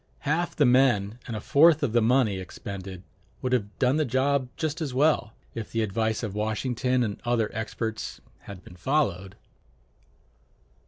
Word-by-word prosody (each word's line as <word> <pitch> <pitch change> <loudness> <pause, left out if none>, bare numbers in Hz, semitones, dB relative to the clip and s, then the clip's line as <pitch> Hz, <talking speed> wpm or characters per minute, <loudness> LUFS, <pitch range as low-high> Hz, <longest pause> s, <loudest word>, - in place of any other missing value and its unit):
Half 155 +4 -1
the 145 - +4
men 120 -4 +3
and 115 - -4
a - - -3
fourth 155 +7 +5
of 120 -6 0
the 120 - +4
money 110 -4 +2
expended 95 0 -8 0.4
would 130 0 0
have 105 -4 -1
done 130 +2 +2
the 155 - +2
job 130 0 +1
just 155 +1 -2
as 140 -5 -3
well, 145 -5 +2 0.2
if 115 -2 -6
the 115 -1 0
advice 110 +2 -1
of 105 -4 -3
Washington 125 +4 0
and 105 -3 -4
other 120 -3 0
experts 110 0 -4 0.3
had 95 -3 -10
been 90 - -14
followed. 100 - -1
120 Hz, 160 wpm, -26 LUFS, 105-135 Hz, 0.4 s, fourth